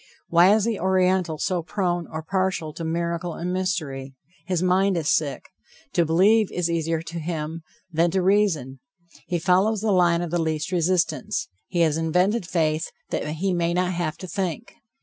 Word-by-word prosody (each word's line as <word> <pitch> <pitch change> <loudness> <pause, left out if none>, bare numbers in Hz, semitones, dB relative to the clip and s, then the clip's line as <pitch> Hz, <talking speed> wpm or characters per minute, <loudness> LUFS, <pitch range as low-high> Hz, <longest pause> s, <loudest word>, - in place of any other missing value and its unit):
Why 175 +3 +6
is 220 -1 +1
the 230 -3 -1
Oriental 185 -3 +2
so 180 +3 -1
prone 175 -1 -2
or 160 0 -6
partial 185 -4 -1
to 165 - -6
miracle 170 +1 -2
and 180 +2 -3
mystery? 155 -8 -3 0.3
His 180 -2 0
mind 185 +1 +3
is 160 -3 -2
sick. 140 -5 -2 0.5
To 170 - +3
believe 200 +6 +4
is 175 -1 -1
easier 165 -1 -1
to 170 0 -6
him 160 0 -4 0.3
than 165 +2 +2
to 185 +1 0
reason. 180 -10 +1 0.5
He 175 - 0
follows 190 +5 +2
the 220 -1 +1
line 175 -2 +3
of 170 - -5
the 175 -1 +1
least 160 +1 -2
resistance: 170 -5 0 0.2
he 175 -2 0
has 160 -2 +3
invented 180 +5 +1
faith 155 -2 0 0.2
that - - -2
he 175 +5 -1
may 170 0 0
not 180 0 +1
have 170 -3 -2
to 185 - -8
think. 190 +5 -3
175 Hz, 175 wpm, -24 LUFS, 160-185 Hz, 0.5 s, Why